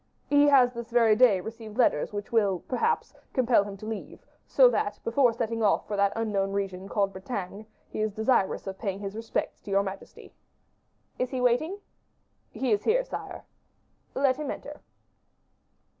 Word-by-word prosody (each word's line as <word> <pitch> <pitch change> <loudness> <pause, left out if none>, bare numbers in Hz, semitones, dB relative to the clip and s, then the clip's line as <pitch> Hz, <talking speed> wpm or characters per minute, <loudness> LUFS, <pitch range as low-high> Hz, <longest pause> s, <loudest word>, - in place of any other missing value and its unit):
"He 290 0 +4
has 255 -3 +5
this 235 -1 -7
very 230 -2 +4
day 215 -5 +5
received 220 +1 -9
letters 230 -12 +2
which 205 0 -6
will, 200 -6 +2
perhaps, 455 - 0 0.2
compel 245 -5 +3
him 200 -1 -8
to 215 - -10
leave, 220 -1 -7 0.2
so - - +6
that, 205 - -1
before 240 +1 +3
setting 230 0 -3
off 210 -2 +2
for 210 - -3
that 200 0 +2
unknown 200 -3 -1
region 195 -1 -3
called 200 -1 0
Bretagne, 200 +1 -6 0.2
he - - -5
is 215 0 0
desirous 220 -1 +1
of 195 -1 -6
paying 195 -4 -3
his 200 0 -6
respects 225 0 -3
to - - -11
your 195 0 +2
majesty." 195 0 -9 0.9
"Is 255 - 0
he 260 - -3
waiting?" 250 +10 +1 0.7
"He 260 -3 -2
is 205 -1 +2
here, - - +2
sire." - - -7 0.7
"Let 265 -1 +2
him 300 - -4
enter." - - -7
220 Hz, 170 wpm, -27 LUFS, 200-250 Hz, 0.9 s, so